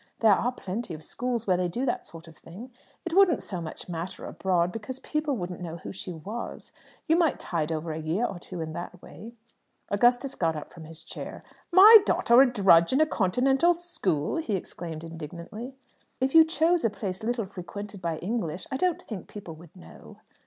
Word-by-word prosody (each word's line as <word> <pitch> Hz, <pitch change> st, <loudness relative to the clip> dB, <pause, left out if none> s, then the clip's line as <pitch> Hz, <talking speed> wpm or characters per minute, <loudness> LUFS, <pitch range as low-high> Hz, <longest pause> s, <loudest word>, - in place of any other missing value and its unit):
There 220 Hz, -3 st, +6 dB
are 235 Hz, +6 st, +1 dB
plenty 195 Hz, -4 st, -5 dB
of 155 Hz, -, -11 dB
schools 240 Hz, +4 st, -3 dB
where 185 Hz, -2 st, +2 dB
they 180 Hz, 0 st, 0 dB
do 240 Hz, +10 st, -2 dB
that 245 Hz, -, -2 dB
sort 165 Hz, 0 st, -12 dB
of 165 Hz, -, -14 dB
thing. 210 Hz, +13 st, -11 dB, 0.3 s
It 345 Hz, -, -4 dB
wouldn't 380 Hz, -2 st, +4 dB
so 180 Hz, -3 st, -5 dB
much 160 Hz, -, -7 dB
matter 170 Hz, +1 st, -5 dB
abroad, 180 Hz, -2 st, 0 dB
because 225 Hz, +5 st, -6 dB
people 300 Hz, -1 st, -2 dB
wouldn't 180 Hz, -2 st, -5 dB
know 170 Hz, -1 st, -5 dB
who -, -, -8 dB
she 190 Hz, -1 st, -7 dB
was. 195 Hz, +8 st, -7 dB, 0.4 s
You 320 Hz, -, +4 dB
might 335 Hz, -4 st, +2 dB
tide 165 Hz, -2 st, -2 dB
over 160 Hz, +1 st, -3 dB
a 155 Hz, -, -4 dB
year 165 Hz, +9 st, 0 dB
or 185 Hz, -, -5 dB
two 175 Hz, -1 st, -7 dB
in 160 Hz, 0 st, -5 dB
that 175 Hz, +2 st, -7 dB
way." 230 Hz, +3 st, -11 dB, 0.5 s
Augustus 245 Hz, +6 st, +2 dB
got 165 Hz, -2 st, 0 dB
up 150 Hz, -, -8 dB
from 165 Hz, -2 st, -11 dB
his 160 Hz, 0 st, -10 dB
chair. -, -, -8 dB, 0.3 s
"My 415 Hz, +5 st, +10 dB
daughter 240 Hz, -, +5 dB
a 265 Hz, -2 st, +4 dB
drudge 185 Hz, -7 st, +5 dB
in 265 Hz, -, +2 dB
a 310 Hz, -, +6 dB
Continental 270 Hz, -, +2 dB
school?" 195 Hz, -, -1 dB
he 275 Hz, -11 st, -1 dB
exclaimed 165 Hz, -3 st, -6 dB
indignantly. 170 Hz, -, -8 dB, 0.4 s
"If 260 Hz, +1 st, 0 dB
you 325 Hz, -1 st, +9 dB
chose 330 Hz, +2 st, +2 dB
a 230 Hz, -, +3 dB
place 190 Hz, -3 st, -5 dB
little 230 Hz, 0 st, -1 dB
frequented 200 Hz, +1 st, -8 dB
by 165 Hz, -2 st, -2 dB
English, 180 Hz, -3 st, -3 dB
I 265 Hz, -, -1 dB
don't 360 Hz, +2 st, 0 dB
think 205 Hz, -6 st, -7 dB
people 195 Hz, -5 st, -9 dB
would 165 Hz, 0 st, -16 dB
know." 80 Hz, -, -14 dB
200 Hz, 200 wpm, -27 LUFS, 170-255 Hz, 0.5 s, My